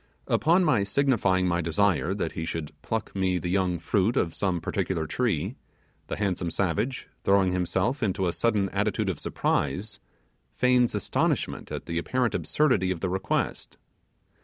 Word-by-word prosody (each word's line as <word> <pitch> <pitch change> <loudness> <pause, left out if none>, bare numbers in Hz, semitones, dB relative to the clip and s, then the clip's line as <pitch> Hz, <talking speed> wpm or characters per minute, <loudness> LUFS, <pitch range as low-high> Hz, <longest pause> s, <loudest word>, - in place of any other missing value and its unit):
Upon 170 +4 +3
my 125 -10 +3
signifying 100 -5 +2
my 85 0 +1
desire 95 +1 +1
that 85 -5 -2
he 80 - -4
should 80 -2 -4
pluck 115 -2 -3
me 95 -1 +1
the 90 0 -3
young 95 -2 +1
fruit 95 +7 +1
of 85 - +1
some 95 -3 0
particular 85 -1 -2
tree, 100 -1 -1 0.5
the - - -3
handsome 95 -4 -1
savage, 100 +10 -1 0.2
throwing 95 -2 +4
himself 90 +9 0
into 95 -3 0
a 85 - 0
sudden 105 -4 +1
attitude 100 0 0
of 90 - -3
surprise, 100 +1 -1 0.6
feigns 125 -2 +3
astonishment 105 - -1
at - - -5
the 85 0 -2
apparent 125 +6 0
absurdity 125 -12 +1
of 90 -3 -2
the 95 - 0
request. 95 -1 -2
95 Hz, 155 wpm, -27 LUFS, 90-110 Hz, 0.6 s, throwing